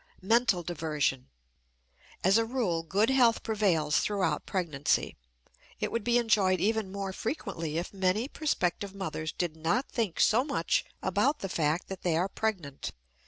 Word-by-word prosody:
MENTAL 225 -3 +3
DIVERSION. 150 -6 -1 0.9
As 195 +5 +5
a - - +2
rule 225 -9 -1
good 200 +9 +1
health 245 -4 +4
prevails 180 -9 +2
throughout 185 -7 -1
pregnancy; 155 -7 0 0.6
it - - -2
would 230 - -1
be 240 +1 +3
enjoyed 200 -6 +3
even 215 +1 0
more 195 -1 -4
frequently 165 - -3
if 175 +4 -4
many 195 +5 +1
prospective 200 - -1
mothers 160 -5 -4
did 175 -3 -3
not 170 - 0
think 220 -8 -2
so 225 +5 +4
much 280 0 0 0.2
about 290 - +1
the 195 - -3
fact 160 0 0
that 190 -1 -7
they 170 -3 +1
are 180 +3 +1
pregnant. 190 -10 -3
190 Hz, 150 wpm, -29 LUFS, 165-220 Hz, 0.9 s, As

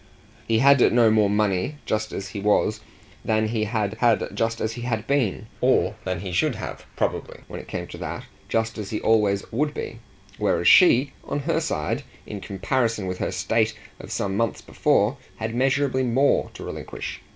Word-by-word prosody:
He 115 - +3
had 140 +3 +6
no 115 -2 +5
more 105 -2 +4
money 105 +4 +1
just 110 0 -1
as 100 - -5
he 105 - -6
was 105 +1 +2 0.4
than 110 0 +1
he 110 -1 0
had 105 -2 -1
had 115 -3 +3
just 115 0 -1
as 110 0 -1
he 120 - -7
had 115 -3 -2
been, 130 -7 0 0.2
or - - +3
than 90 -2 -2
he 95 -2 -5
should 85 - +1
have, - - -7
probably, - - -2
when - - -7
it - - -11
came - - -4
to - - -10
that, - - -5 0.3
just 110 -1 -1
as 100 -2 -5
he 105 - -2
always 105 -3 +2
would 150 +5 -1
be; 115 - -5 0.4
whereas 85 - +1
she, 140 -6 +6
on 145 - -3
her 160 +3 0
side, 75 - -2 0.2
in 105 -2 -7
comparison 115 +2 -1
with 90 0 -4
her - - -1
state 110 -1 0 0.2
of - - -10
some 95 -1 -1
months 115 0 0
before, 110 +7 +2 0.2
had 110 0 -4
measureably 130 +1 +1
more 130 +3 +2
to - - -8
relinquish. - - -6
110 Hz, 185 wpm, -24 LUFS, 105-125 Hz, 0.4 s, had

